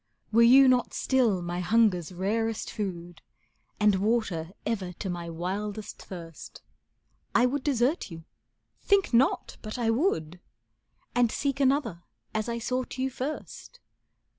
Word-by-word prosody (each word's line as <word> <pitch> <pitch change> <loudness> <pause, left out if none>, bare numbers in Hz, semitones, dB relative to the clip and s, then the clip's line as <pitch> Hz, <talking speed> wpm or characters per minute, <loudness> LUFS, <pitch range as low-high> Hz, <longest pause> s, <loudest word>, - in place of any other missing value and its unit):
Were 230 +1 +5
you 260 +3 +8
not 250 -1 +2
still 230 -9 +2
my 175 +1 -3
hunger's 185 -3 +2
rarest 220 +5 -2
food, 175 -4 -5 0.6
And 210 -2 +4
water 200 -6 0 0.2
ever 195 -6 -2
to 190 +2 -5
my 170 -1 -5
wildest 200 +5 -4
thirst, 165 -4 -10 0.7
I 240 - +5
would 260 +2 -1
desert 270 +1 +1
you 165 -2 -10 0.6
think 400 -8 +2
not 245 +4 +2
but 215 +1 -6
I 230 -2 +1
would! 180 - 0 0.7
And 245 -2 +3
seek 275 -1 -1
another 265 - +1 0.3
as 215 +2 -1
I 235 - -2
sought 255 +2 -3
you 265 +1 -1
first. 300 - -6
220 Hz, 135 wpm, -28 LUFS, 180-250 Hz, 0.7 s, you